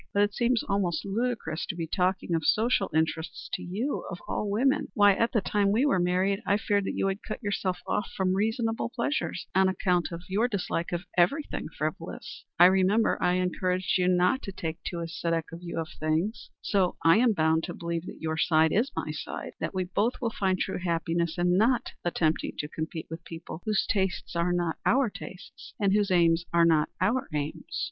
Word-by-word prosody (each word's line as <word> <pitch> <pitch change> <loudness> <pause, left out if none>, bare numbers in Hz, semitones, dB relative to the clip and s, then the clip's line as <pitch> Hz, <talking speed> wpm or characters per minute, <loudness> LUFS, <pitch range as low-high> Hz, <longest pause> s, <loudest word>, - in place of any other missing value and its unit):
But 205 - +5
it 205 0 0
seems 240 0 +1
almost 195 -5 -1
ludicrous 205 -6 -2
to - - -3
be 170 -1 -3
talking 180 +1 0
of 165 -1 +1
social 230 +9 +2
interests 160 +1 -1
to - - -2
you, 220 +11 -3
of 175 - -5
all 210 - -2
women. 265 +8 +2
Why, 205 -3 +6
at 230 +4 +1
the 220 - +2
time 200 +1 +1
we 235 +7 +3
were 275 -10 +3
married, 185 +3 +1
I 200 - +2
feared 205 -2 0
that - - -3
you - - 0
would 195 +1 -1
cut 220 - -6
yourself 195 -3 -1
off 210 - -1
from 185 -1 +2
reasonable 225 +3 0
pleasures 240 -5 -2
on 190 0 +4
account 180 -2 +1
of 170 +1 -6
your 210 +6 +1
dislike 180 -6 -2
of 175 0 -2 0.2
everything 280 - +1
frivolous. - - -5
I 175 - +9
remember 190 +4 +3
I 180 - +3
encouraged 185 +1 0
you 180 - +2
not 180 +8 +3
to 195 - -6
take 165 -3 -5
too 170 0 -4
ascetic 165 -1 -2
a 165 - -7
view 170 -1 -7
of 160 -1 -3
such - - -15
things. 160 +9 -1
So 190 -4 +1
I 165 +4 +7
am 235 -1 +4
bound 160 -2 +2
to - - -5
believe 170 0 -4
that - - -9
your 160 0 -2
side 160 -1 +3
is 240 +7 +1
my - - -2
side - - -6
that - - -3
we 185 - +1
both 205 +7 0
will 230 -2 -1
find 190 -3 0
true - - -2
happiness 170 -1 -1
in 175 +1 +2
not 240 +2 +2
attempting 165 -2 0
to 150 - -3
compete 160 +1 -5
with 165 +1 -6
people 165 0 -8
whose 215 -2 +1
tastes 190 -4 -1
are 170 +1 +1
not 175 -2 0
our 255 -3 +3
tastes, 185 -1 -11
and 200 -2 +2
whose 205 -1 +2
aims 170 -2 +4
are 170 0 +5
not 160 -2 +3
our 225 +8 +1
aims." 150 - -4
185 Hz, 205 wpm, -28 LUFS, 170-210 Hz, 0.2 s, I